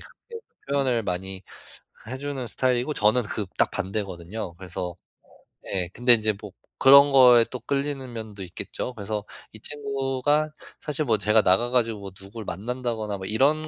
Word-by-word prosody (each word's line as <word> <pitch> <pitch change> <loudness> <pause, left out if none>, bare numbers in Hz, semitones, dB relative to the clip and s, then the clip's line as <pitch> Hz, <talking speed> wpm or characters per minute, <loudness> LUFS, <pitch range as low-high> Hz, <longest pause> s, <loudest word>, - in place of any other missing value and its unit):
그렇게 460 -1 -13 0.2
표현을 135 -4 +1
많이 95 0 -4 0.7
해 130 +2 -5
주는 140 -3 -4
스타일이고 125 +4 0
저는 110 +2 +4
그 105 0 -4
딱 - - +3
반대거든요. 95 -1 -5
그래서 90 -1 -6 0.7
예 90 -3 -2
근데 120 +1 +6
인제 110 -2 +2
뭐 105 - -9 0.3
그런 140 +1 +8
거에 125 -3 +7
또 125 - -5
끌리는 140 -2 -3
면도 110 -4 -7
있겠죠. 95 +7 -6
그래서 105 0 -4 0.3
이 110 - -12
친구가 140 +1 -1 0.3
사실 150 0 -2
뭐 110 -3 +3
제가 105 +2 +3
나가 100 +7 +3
가지고 115 -4 +1
뭐 100 -1 -8
누굴 100 +4 -10
만난다거나 110 +1 -3
뭐 95 - -7
이런 145 +8 +2
115 Hz, 330 characters per minute, -25 LUFS, 100-135 Hz, 0.7 s, 그런